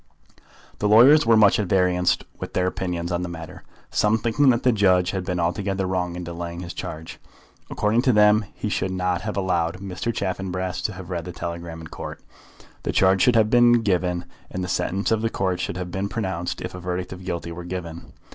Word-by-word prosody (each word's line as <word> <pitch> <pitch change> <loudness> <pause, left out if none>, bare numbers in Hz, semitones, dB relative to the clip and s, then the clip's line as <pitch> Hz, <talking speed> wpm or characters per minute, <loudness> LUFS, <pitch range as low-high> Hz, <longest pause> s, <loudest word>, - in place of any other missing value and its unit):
The 105 - +1
lawyers 120 +7 +7
were 115 -1 +6
much 105 -1 +5
at 105 - -1
variance 90 -1 +2 0.2
with - - -6
their 90 - +1
opinions 90 -2 -3
on 85 0 -1
the 90 - -4
matter, 80 -2 -8 0.3
some 105 +1 +2
thinking 115 +5 +2
that 120 -1 +2
the 125 - +5
judge 95 -4 +3
had 95 -2 -3
been 90 0 -2
altogether 95 +3 -1
wrong 90 -2 -2
in 90 - -5
delaying 85 0 -6
his 85 -2 -7
charge. 80 0 -7 0.5
According 105 +3 +1
to 130 - +3
them 105 0 +5
he - - -4
should 95 -2 -1
not 90 -1 -1
have 105 -1 -4
allowed 90 -3 0
Mr. 95 +4 -4
Chaffanbrass 95 -2 -3
to 105 - -1
have 95 -1 -9
read 85 -2 -3
the 90 - -6
telegram 85 -1 -6
in - - -9
Court. - - -7 0.6
The - - -2
charge 95 0 +3
should 120 +5 +4
have 110 -1 +3
been 120 -1 +5
given, 90 -3 0 0.2
and 95 - -4
the - - -3
sentence 95 +3 -1
of 110 -1 +2
the 115 - 0
Court 95 -4 -1
should 90 0 -3
have 90 -1 -5
been 95 +2 -2
pronounced 95 -5 -3
if - - -5
a 90 - -7
verdict 90 +1 -4
of 95 0 -10
guilty 85 -2 -4
were 85 +1 -7
given. 85 -2 -7
95 Hz, 215 wpm, -23 LUFS, 90-105 Hz, 0.6 s, lawyers